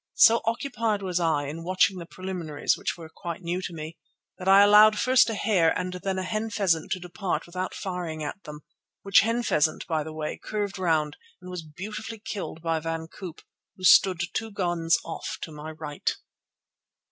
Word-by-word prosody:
So 230 +1 +7
occupied 230 -3 -1
was 180 -2 -1
I 160 -4 +1
in 155 +4 -6
watching 185 +1 +2
the 170 - -8
preliminaries, 175 -6 -2
which - - -3
were 165 -2 -9
quite 170 +2 -7
new 175 +2 -2
to 185 - -5
me, 160 0 -7 0.4
that 185 - -6
I 195 +1 +8
allowed 210 +1 +7
first 255 0 +4
a 225 - -2
hare 195 -6 +2
and 180 0 -3
then 195 -1 -2
a 185 - -1
hen 215 +3 -2
pheasant 185 -7 0
to 185 - -4
depart 180 +2 -3
without 185 +2 -4
firing 175 -5 -4
at 150 +7 -5
them, 150 0 -9 0.4
which 195 0 +6
hen 230 +3 +1
pheasant, 155 -6 +1
by 160 -2 0
the 160 - -7
way, 155 -1 -4
curved 205 -2 -3
round 155 -4 +1 0.2
and 180 0 -10
was 180 -2 -4
beautifully 210 +8 -7
killed 205 -6 -6
by 165 -1 0
Van 165 0 -4
Koop, 180 -3 -9 0.4
who 185 - -13
stood 185 -1 +6
two 225 - -2
guns 175 -5 +1
off 165 - -5
upon 160 - -7
my 150 +1 -7
right. 155 -2 -3
180 Hz, 190 wpm, -26 LUFS, 160-200 Hz, 0.4 s, I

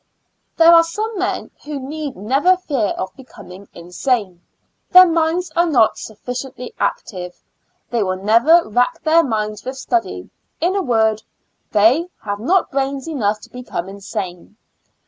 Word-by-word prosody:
There 335 +1 +7
are 335 0 +8
some 425 +7 -4
men 375 - -2
who 295 -1 -5
need 285 0 -6
never 275 - +2
fear 280 - -1
of 185 - -5
becoming 200 -7 -13
insane 180 +1 -2 0.3
— - - -50
their 365 0 +10
minds 335 +1 0
are 345 +1 +3
not 240 -8 +3
sufficiently 250 +3 -7
active 180 -5 -4 0.2
— - - -47
they 235 -2 0
will 185 -2 0
never 230 - +4
rack 250 +10 0
their 330 +1 +4
minds 215 -4 -3
with 260 +1 -6
study 345 +6 -2
— - - -50
in 355 +4 0
a 395 - +1
word, 220 - +1 0.5
they 230 - +4 0.2
have 205 -1 -4
not 350 - +1
brains 275 0 -2
enough 215 -9 -1
to - - -15
become 250 -8 -6
insane. 195 -1 -7
255 Hz, 155 wpm, -19 LUFS, 210-330 Hz, 0.5 s, their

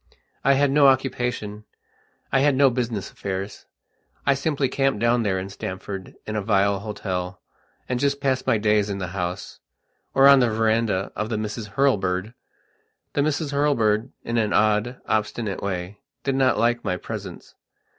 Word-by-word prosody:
I 140 - +5
had 140 0 +3
no 145 0 +5
occupationI 125 -5 +1 0.7
had 135 +1 +3
no 135 -1 +5
business 120 -5 -3
affairs. 95 +1 -5 0.6
I 140 - +5
simply 140 0 0
camped 135 -3 0
down 120 +1 +3
there 100 -4 0
in 95 +1 -4
Stamford, 95 0 -6
in 110 - -4
a 105 - 0
vile 100 -1 +2
hotel, 95 -3 -4 0.5
and 125 -1 -1
just 140 +1 +1
passed 135 -2 0
my 125 -4 +4
days 105 -1 +2
in 100 - -2
the 90 -2 -4
house, 90 -1 -4 0.6
or 135 0 +7
on 140 -1 +8
the 125 -2 +3
verandah 110 -3 +1
of 105 +1 -3
the 110 - -1
Misses 105 0 -4
Hurlbird. 105 -6 +1 0.8
The 145 - +1
Misses 150 0 -1
Hurlbird, 115 -7 +2
in 115 0 0
an 105 -2 0
odd, 110 +4 +2
obstinate 110 -1 -1
way, 95 0 -4 0.2
did 135 - 0
not 130 -1 +3
like 120 +1 +1
my 90 - -1
presence. 100 -4 -8
110 Hz, 160 wpm, -24 LUFS, 100-135 Hz, 0.8 s, on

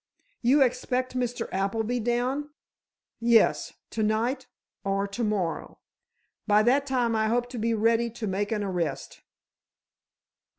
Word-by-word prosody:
"You 270 +4 +5
expect 255 0 -1
Mr. 245 -1 -2
Appleby 220 +5 -1
down?" 245 +5 -1 0.7
"Yes; 235 -1 +3 0.2
to 225 - -2
night 230 +5 0 0.4
or 195 0 0
to 200 +4 -4
morrow. 200 -6 -2 0.7
By 210 0 +5
that 275 +5 +3
time 245 -4 +1
I 220 0 +2
hope 240 +2 0
to 245 -2 -6
be 230 +1 +1
ready 230 +2 +2
to 230 0 -6
make 205 +1 -2
an 210 -2 0
arrest." 175 -7 -3
230 Hz, 130 wpm, -27 LUFS, 210-245 Hz, 0.7 s, You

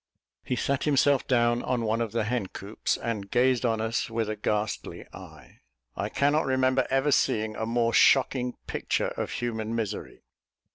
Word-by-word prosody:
He 125 - -2
sat 140 +2 -1
himself 140 -2 +3
down 120 -1 +2
on 125 -2 -1
one 110 +2 0
of 115 -3 -2
the 115 0 0
hen 110 -2 -1
coops, 100 +3 -3
and 110 -4 -4
gazed 125 +1 +2
on 115 -1 0
us 110 +1 -1
with 115 -1 -2
a - - -3
ghastly 105 0 -3
eye. - - -13 0.4
I - - -3
cannot 145 +2 +1
remember 130 0 +2
ever 135 +2 +2
seeing 110 -4 +1
a 110 - -3
more 115 0 +1
shocking 125 -2 +4
picture - - -1
of - - -4
human 115 -2 -3
misery. 110 -3 -4
120 Hz, 170 wpm, -27 LUFS, 110-130 Hz, 0.4 s, shocking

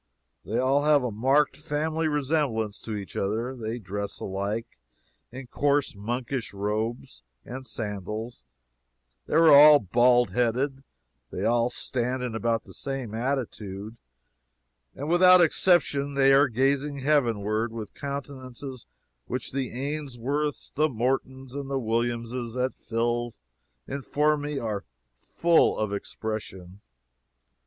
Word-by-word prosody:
They - - -3
all 135 +3 +3
have 145 -2 +4
a 125 - -1
marked 135 +7 +2
family 155 +1 -1
resemblance 140 -8 -1
to 110 - -5
each 100 -2 -7
other, 115 +6 -2
they 115 -1 -4
dress 100 -1 -5
alike, 100 - -4 0.5
in 130 +2 -8
coarse 140 +1 0
monkish 120 +2 -4
robes 105 - -3 0.2
and 130 +1 -7
sandals, 105 - -5 0.8
they - - -2
are 165 0 +7
all 150 +1 +10
bald 120 0 +3
headed, 125 +5 0 0.5
they - - -4
all 120 +1 +2
stand 125 +1 -2
in 125 -2 -3
about 115 0 0
the - - -14
same 135 -5 -5
attitude, 110 -4 -3 1.0
and 145 - -5
without 180 +2 +7
exception 155 -5 +3
they 135 0 +5
are 140 +1 +6
gazing 135 +3 0
heavenward 115 -6 +1
with 110 -3 -7
countenances 135 -2 -7 0.4
which 125 0 -4
the 135 -2 -2
Ainsworths, 140 +1 -3
the 155 +2 +2
Mortons 130 +1 -2
and 140 -1 -5
the 135 - -1
Williamses, 120 0 -2
et 130 +1 0
fils, 120 +1 -2 0.5
inform 145 +2 0
me 145 0 -3
are 110 -5 -3 0.3
full 165 - +2
of 105 -2 -1
"expression." 100 -3 -6
125 Hz, 125 wpm, -26 LUFS, 110-140 Hz, 1.0 s, all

